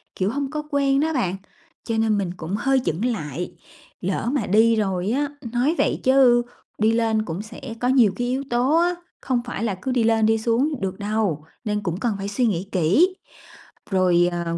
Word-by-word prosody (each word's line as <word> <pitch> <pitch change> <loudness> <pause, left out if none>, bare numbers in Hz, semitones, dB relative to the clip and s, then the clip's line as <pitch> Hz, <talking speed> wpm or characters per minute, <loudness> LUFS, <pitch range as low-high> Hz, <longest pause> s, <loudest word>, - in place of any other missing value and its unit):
kiểu, 190 +1 0
hông 280 +1 -2
có 305 0 -3
quen 275 -1 +2
đó 320 +2 +1
bạn. 195 - 0 0.5
Cho 225 -1 -2
nên 220 -1 +2
mình 185 -3 -2
cũng 170 +4 -4
hơi 270 +4 +2
chững 170 +9 -1
lại, 175 - -3 0.5
lỡ 195 +5 -1
mà 270 -8 0
đi 225 +4 +4
rồi 195 -2 -1
á 285 +4 +1 0.3
nói 260 +7 +2
vậy - - 0
chứ 260 -2 +5 0.4
đi 215 +1 +3
lên 225 -1 +1
cũng 170 +1 -4
sẽ 215 +6 -11 0.2
có 245 - 0
nhiều 250 -6 +5
cái 245 +3 -2
yếu 260 +2 -1
tố 250 +6 +2
á, 350 +1 +2 0.3
không 255 -3 0
phải 240 -3 -4
là 215 -4 -1
cứ 260 - -2
đi 250 -2 +2
lên 225 -1 +3
đi 225 +1 +3
xuống 245 +6 0
được 190 0 -3
đâu, 205 -7 -1 0.2
nên 210 -2 -2
cũng 175 -1 -3
cần 225 -2 0
phải 195 0 -4
suy 225 +5 0
nghĩ 195 -4 -1
kỹ. 200 - +3 0.8
Rồi, 180 -2 +3
ờ 170 -1 -2
225 Hz, 205 wpm, -23 LUFS, 190-255 Hz, 0.8 s, chứ